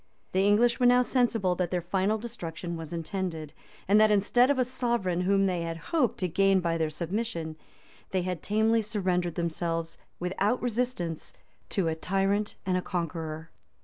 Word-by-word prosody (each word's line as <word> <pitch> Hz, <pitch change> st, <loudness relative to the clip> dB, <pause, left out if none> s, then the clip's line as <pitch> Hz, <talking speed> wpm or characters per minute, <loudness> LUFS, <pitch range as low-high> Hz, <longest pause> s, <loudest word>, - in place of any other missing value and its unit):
[*] -, -, -41 dB
The 190 Hz, +2 st, +2 dB
English 235 Hz, +4 st, +4 dB
were 250 Hz, -, +5 dB
now 250 Hz, 0 st, +6 dB
sensible 230 Hz, -7 st, +1 dB
that 180 Hz, -1 st, -1 dB
their 180 Hz, -, 0 dB
final 190 Hz, +4 st, +1 dB
destruction 175 Hz, -7 st, -6 dB
was 165 Hz, -2 st, -7 dB
intended; 165 Hz, -2 st, -4 dB, 0.3 s
and 205 Hz, +3 st, +5 dB
that 215 Hz, -, +6 dB
instead 210 Hz, +5 st, +4 dB
of 285 Hz, -, +2 dB
a 255 Hz, -, +2 dB
sovereign, 235 Hz, -8 st, -1 dB
whom 195 Hz, +1 st, +3 dB
they 180 Hz, -3 st, 0 dB
had 165 Hz, 0 st, -3 dB
hoped 255 Hz, -, 0 dB
to 185 Hz, -, +1 dB
gain 195 Hz, +2 st, +3 dB
by 165 Hz, -2 st, -1 dB
their 160 Hz, -1 st, +1 dB
submission, 170 Hz, 0 st, -3 dB, 0.5 s
they 185 Hz, -2 st, 0 dB
had 180 Hz, -3 st, -3 dB
tamely 220 Hz, +2 st, +2 dB
surrendered 185 Hz, -5 st, -1 dB
themselves, 165 Hz, -1 st, -2 dB, 0.2 s
without 195 Hz, +6 st, 0 dB
resistance, 235 Hz, -9 st, -2 dB, 0.4 s
to 190 Hz, -4 st, 0 dB
a 160 Hz, -, +1 dB
tyrant 195 Hz, +5 st, 0 dB
and 185 Hz, -1 st, +1 dB
a -, -, 0 dB
conqueror. 165 Hz, -3 st, -4 dB
190 Hz, 175 wpm, -28 LUFS, 170-220 Hz, 0.5 s, now